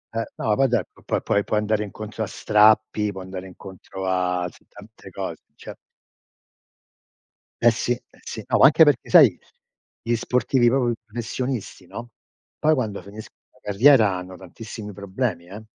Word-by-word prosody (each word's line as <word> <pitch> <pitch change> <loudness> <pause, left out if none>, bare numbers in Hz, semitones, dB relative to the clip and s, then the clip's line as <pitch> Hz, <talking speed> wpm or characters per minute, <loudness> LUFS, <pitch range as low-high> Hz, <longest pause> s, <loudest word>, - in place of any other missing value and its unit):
Ehm, 115 - 0
no, 105 -1 0
poi 135 0 +3
do 120 -5 +1 0.2
puo - - -1
puoi 100 - +1
puoi 105 - 0
andare 105 0 0
incontro 110 +2 -8
a - - -4
strappi, 105 0 +3
puoi 95 -1 -8
andare 95 0 -8
incontro 95 +1 -9
a 90 -1 0
s - - -15
tante - - -14
cose, - - -6
cioè - - -10 1.9
Eh 120 0 +6
sì, 115 +2 -2
eh 120 - -14
sì. - - -7
No, - - +1
anche 155 +4 +7
perché 145 -5 +2
sai, 145 - +7 0.6
gli 120 +1 0
sportivi 125 +1 +1
proprio 125 -2 +1
i - - -3
professionisti, 120 +1 -5
no, 120 +1 -8 0.5
poi 155 +1 +3
quando 110 -9 -2
finisc 105 +3 -11 0.2
la - - -27
carriera 110 -2 +5
hanno 90 0 -7
tantissimi 105 +3 -9
problemi 100 -2 -4
eh. 105 +4 -10
110 Hz, 160 wpm, -23 LUFS, 95-120 Hz, 1.9 s, anche